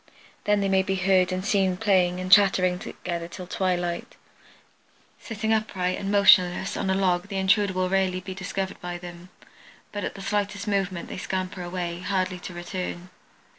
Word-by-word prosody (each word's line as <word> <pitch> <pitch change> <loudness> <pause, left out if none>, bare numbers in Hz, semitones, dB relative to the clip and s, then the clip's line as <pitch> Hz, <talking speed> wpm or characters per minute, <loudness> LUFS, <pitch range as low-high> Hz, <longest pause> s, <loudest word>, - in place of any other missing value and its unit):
Then 210 -1 +3
they 195 - +1
may 190 0 +3
be 190 0 -1
heard 185 -1 +3
and 185 +1 -3
seen 195 -3 +2
playing 185 -4 +2
and 185 0 -4
chattering 190 -3 +5
together 170 -2 -5
till 180 +1 -8
twilight. 175 -2 -2 1.0
Sitting 220 -1 -2
upright 190 -4 -1
and 195 - -3
motionless 190 -2 +5
on 190 - -2
a 190 - +2
log 185 -1 +1
the 200 -1 -4
intruder 195 +1 +3
will 185 0 0
rarely 190 -1 +1
be 190 +1 -7
discovered 190 0 -4
by 175 0 -4
them, 175 0 -10 0.6
but 205 -1 -4
at - - -4
the 195 - -8
slightest 205 +1 -2
movement 195 -3 -1
they - - -7
scamper 185 0 -3
away, 175 -1 -4
hardly 185 0 -1
to 180 - -8
return. 180 0 -5
185 Hz, 170 wpm, -25 LUFS, 180-195 Hz, 1.0 s, chattering